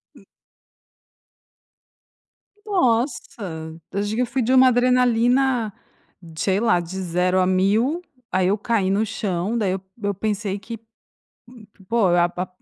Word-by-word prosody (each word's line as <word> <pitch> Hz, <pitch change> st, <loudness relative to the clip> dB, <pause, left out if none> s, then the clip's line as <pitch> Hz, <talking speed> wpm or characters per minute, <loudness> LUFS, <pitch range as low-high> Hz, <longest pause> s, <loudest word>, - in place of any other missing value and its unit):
Hu -, -, -18 dB, 2.4 s
Nossa! 265 Hz, -, +1 dB, 0.7 s
Eu 200 Hz, -, -2 dB
digo, 215 Hz, +4 st, -1 dB
eu -, -, +2 dB
fui 250 Hz, +2 st, -2 dB
de 250 Hz, +3 st, +1 dB
uma 260 Hz, 0 st, +7 dB
adrenalina, 245 Hz, -1 st, +2 dB, 0.6 s
sei 190 Hz, +3 st, +1 dB
lá, 225 Hz, -6 st, +3 dB
de 175 Hz, +3 st, -6 dB
0 180 Hz, +1 st, +1 dB
a 185 Hz, -, +3 dB
1.000, 215 Hz, -, +1 dB, 0.3 s
aí 185 Hz, -1 st, +2 dB
eu 200 Hz, +3 st, +2 dB
caí 210 Hz, -3 st, 0 dB
no 205 Hz, +3 st, +1 dB
chão, 205 Hz, -1 st, -2 dB
daí 205 Hz, -5 st, 0 dB
eu 185 Hz, 0 st, -3 dB, 0.2 s
eu 200 Hz, 0 st, 0 dB
pensei 205 Hz, 0 st, -2 dB
que 230 Hz, +1 st, -8 dB, 0.8 s
Hum 220 Hz, -, -14 dB, 0.2 s
Pô, 230 Hz, -4 st, +2 dB
a 175 Hz, 0 st, +3 dB
pa 180 Hz, +1 st, -4 dB
215 Hz, 140 wpm, -22 LUFS, 190-245 Hz, 2.4 s, uma